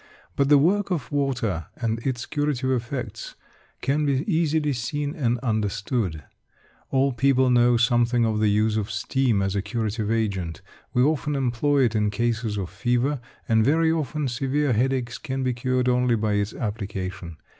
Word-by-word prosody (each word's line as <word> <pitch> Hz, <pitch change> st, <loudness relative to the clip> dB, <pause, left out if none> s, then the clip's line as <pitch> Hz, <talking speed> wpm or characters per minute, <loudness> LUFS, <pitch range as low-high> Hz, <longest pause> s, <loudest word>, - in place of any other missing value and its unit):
But 140 Hz, 0 st, +2 dB
the 145 Hz, -, +7 dB
work 195 Hz, +8 st, +2 dB
of 165 Hz, -9 st, -3 dB
water 125 Hz, -, -1 dB
and 115 Hz, -2 st, -1 dB
its 120 Hz, 0 st, -3 dB
curative 145 Hz, -3 st, -1 dB
effects 125 Hz, +1 st, -4 dB, 0.5 s
can 145 Hz, +3 st, +1 dB
be 140 Hz, -1 st, +1 dB
easily 160 Hz, -5 st, +1 dB
seen 145 Hz, +4 st, -3 dB
and 125 Hz, -7 st, 0 dB
understood. 105 Hz, -, -1 dB, 0.7 s
All 135 Hz, 0 st, +2 dB
people 130 Hz, +1 st, +3 dB
know 120 Hz, 0 st, +4 dB
something 120 Hz, 0 st, +3 dB
of 110 Hz, -1 st, 0 dB
the 110 Hz, -, +3 dB
use 105 Hz, +1 st, +2 dB
of 105 Hz, 0 st, -2 dB
steam 110 Hz, 0 st, 0 dB
as 95 Hz, 0 st, -1 dB
a 100 Hz, -, +1 dB
curative 110 Hz, 0 st, -2 dB
agent. 100 Hz, -7 st, -2 dB, 0.3 s
We 125 Hz, -, +3 dB
often 150 Hz, 0 st, +1 dB
employ 135 Hz, +2 st, +1 dB
it 115 Hz, -3 st, +2 dB
in 105 Hz, -1 st, +1 dB
cases 115 Hz, 0 st, -1 dB
of 95 Hz, -4 st, -4 dB
fever, 120 Hz, +8 st, 0 dB, 0.3 s
and 110 Hz, -1 st, +3 dB
very 160 Hz, +5 st, +3 dB
often 155 Hz, -2 st, -1 dB
severe 135 Hz, +2 st, 0 dB
headaches 125 Hz, +1 st, 0 dB
can 135 Hz, -3 st, -3 dB
be 130 Hz, -1 st, +1 dB
cured 125 Hz, +1 st, 0 dB
only 125 Hz, -1 st, +3 dB
by 110 Hz, -1 st, 0 dB
its 105 Hz, 0 st, -1 dB
application. 95 Hz, -6 st, -5 dB
120 Hz, 165 wpm, -24 LUFS, 110-140 Hz, 0.7 s, the